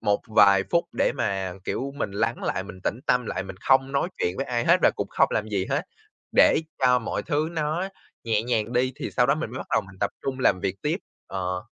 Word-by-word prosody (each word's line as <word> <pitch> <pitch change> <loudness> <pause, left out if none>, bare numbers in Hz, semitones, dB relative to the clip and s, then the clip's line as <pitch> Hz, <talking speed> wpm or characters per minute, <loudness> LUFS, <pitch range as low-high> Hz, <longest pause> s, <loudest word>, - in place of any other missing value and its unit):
một 100 0 +1
vài 100 -3 +6
phút 170 0 +3
để - - +1
mà, 95 -2 -2
kiểu, 135 +1 -3
mình 100 - -2
lắng 115 +4 -1
lại, 95 - -1
mình 95 -2 -10
tĩnh 115 - -1
tâm 125 -2 +2
lại, 95 - -2
mình 95 -1 -9
không 135 0 +3
nói 140 +5 +1
chuyện 90 +2 -1
với 135 - -2
ai 120 -1 -1
hết - - +6
và - - +6
cũng - - -2
không - - +3
làm 110 0 -1
gì 100 -3 -1
hết, - - 0 0.5
để - - +6 0.2
cho 125 -1 +5
mọi 115 - -3
thứ 155 0 0
nó 160 +4 -1 0.4
nhẹ 110 -2 +1
nhàng 115 -1 -1
đi 130 +1 +1
thì - - -4
sau 125 - +2
đó 140 - +4
mình 155 -7 -4
mới 130 - -6
bắt - - -6
đầu - - +3
mình 100 - -14
tập 100 - +1
trung 135 -1 -3
làm 95 -7 +3
việc 95 0 -3
tiếp. 155 +3 +1 0.3
Ờ. 90 -1 -3
115 Hz, 245 wpm, -25 LUFS, 100-135 Hz, 0.5 s, vài